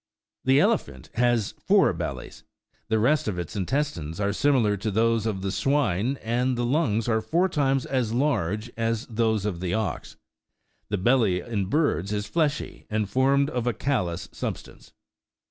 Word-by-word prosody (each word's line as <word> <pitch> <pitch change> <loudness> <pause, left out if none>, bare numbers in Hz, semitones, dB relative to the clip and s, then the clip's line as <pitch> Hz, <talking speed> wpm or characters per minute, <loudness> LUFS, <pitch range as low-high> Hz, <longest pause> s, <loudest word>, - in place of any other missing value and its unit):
The 135 +1 +5
elephant 150 - 0
has 120 -3 +1 0.2
four93 - - +4
bellies; - - -6 0.4
the 110 - +1
rest 140 +7 +2
of 100 -4 -2
its 90 +4 -5
intestines 100 - -2
are 100 0 0
similar 125 -8 +2
to 105 +3 -2
those 115 +1 +1
of 95 -3 -3
the 95 - -1
swine, 130 -1 +1
and 125 +2 0
the 120 - 0
lungs 120 -5 +1
are 110 -1 +2
four 175 +10 +1
times 135 -6 +1
as 125 -5 -1
large 115 - 0
as 115 +1 -1
those 110 -3 0
of 95 -5 -2
the 90 0 -1
ox. 110 -6 -3 0.7
The 105 - 0
belly 110 -3 +3
in 100 -4 -3
birds 105 - +1
is 105 0 -2
fleshy, 150 +5 -2
and 110 -1 0
formed 140 +5 +2
of 125 -3 -2
a 120 - +2
callous 90 -12 -2
substance. - - -7
115 Hz, 165 wpm, -25 LUFS, 105-135 Hz, 0.7 s, The